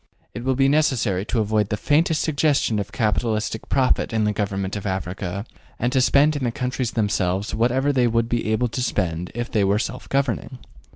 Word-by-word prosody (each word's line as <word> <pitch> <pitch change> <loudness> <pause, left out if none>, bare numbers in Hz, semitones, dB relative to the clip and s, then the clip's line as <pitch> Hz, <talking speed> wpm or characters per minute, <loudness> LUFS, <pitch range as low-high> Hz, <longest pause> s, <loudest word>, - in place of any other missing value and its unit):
It 120 - -6
will 130 0 +1
be 135 +1 +3
necessary 125 -10 +1
to 110 - 0
avoid 105 -1 0
the 105 - -1
faintest 155 +5 +2
suggestion 140 -7 +1
of 100 - -4
capitalistic 110 -1 -1
profit 130 -2 +2
in 110 -1 +1
the 105 0 +1
government 100 -1 -2
of 100 0 -4
Africa, 95 +1 -4 0.3
and 120 +1 -1
to 130 - +3
spend 145 +4 +4
in 145 - -3
the 120 - 0
countries 125 -1 -2
themselves 100 -2 0
whatever 130 +5 +1
they 125 -2 +3
would 115 0 +1
be 115 -2 -1
able 125 +3 +1
to 115 +3 -3
spend 90 -7 -1
if 120 0 -4
they 105 -3 +2
were 100 +1 +2
self 125 +3 -4
governing. 130 -3 -1
115 Hz, 195 wpm, -22 LUFS, 105-130 Hz, 0.3 s, spend